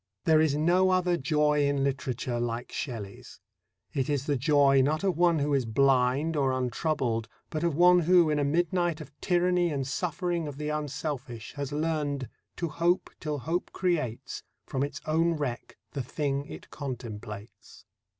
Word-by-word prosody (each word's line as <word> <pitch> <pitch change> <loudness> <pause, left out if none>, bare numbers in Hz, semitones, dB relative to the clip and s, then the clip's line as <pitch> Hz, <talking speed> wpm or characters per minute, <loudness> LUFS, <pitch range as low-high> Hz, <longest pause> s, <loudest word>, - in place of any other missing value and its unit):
There 160 -1 +5
is 155 -3 +2
no 175 +5 +3
other 180 -1 +2
joy 150 0 +2
in 140 -1 +1
literature 130 -3 -2
like 120 0 -3
Shelley's. 110 -7 -6 0.5
It 135 0 -1
is 140 -2 0
the 145 - +1
joy 140 0 +4
not 155 +5 +1
of 190 -3 +1
one 170 0 +4
who 145 0 0
is 135 -3 +2
blind 135 +5 +2
or 135 -3 +2
untroubled, 125 -2 -1 0.2
but 155 +1 -2
of 170 -4 +1
one 180 +2 +6
who, 175 0 +5
in 150 - +1
a - - +2
midnight 175 +2 +1
of - - -9
tyranny 180 -1 +2
and 140 -4 -2
suffering 170 +3 -2
of 145 -2 -7
the 150 0 -3
unselfish, 145 -5 -4
has 145 -1 -4
learned... 145 -4 -1 0.3
to 170 - -2
hope 170 +3 +1
till 150 -1 -3
Hope 165 +7 -2
creates 155 -11 -2 0.2
From 130 - -3
its 140 0 -4
own 165 +2 +2
wreck 135 -6 -4
the 140 - -3
thing 140 +2 -2
it - - -10
contemplates. 110 -7 -8
145 Hz, 165 wpm, -28 LUFS, 130-165 Hz, 0.5 s, one